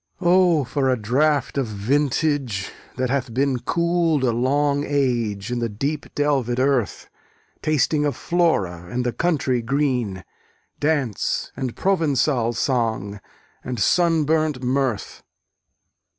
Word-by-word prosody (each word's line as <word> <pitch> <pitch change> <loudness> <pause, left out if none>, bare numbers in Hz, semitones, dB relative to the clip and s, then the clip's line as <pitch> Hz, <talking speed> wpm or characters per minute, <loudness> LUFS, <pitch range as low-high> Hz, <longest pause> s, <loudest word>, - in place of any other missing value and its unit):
O, 175 -3 +4
for 135 +1 -1
a 130 - +2
draught 140 +5 +1
of 130 - -1
vintage, 130 0 0 0.3
that 130 -1 -1
hath 135 -3 -1
been 135 -1 +1
Cool'd 170 -1 +1
a 125 - +3
long 140 +4 +1
age 120 -8 -1
in 125 - -1
the 115 -1 -1
deep 140 +8 -3
delvèd 135 -5 +1
earth, 130 -5 0 0.5
Tasting 150 0 +1
of 145 -1 0
Flora 100 - 0
and 125 +4 -2
the 120 - -1
country 140 -8 0
green, 125 -7 -1 0.6
Dance, 145 -9 -1
and 130 -3 -4
Provençal 145 -10 +1
song, 110 -5 -1 0.4
and 125 -2 -4
sunburnt 155 - +2
mirth! 130 -4 -1
135 Hz, 120 wpm, -22 LUFS, 120-150 Hz, 0.6 s, O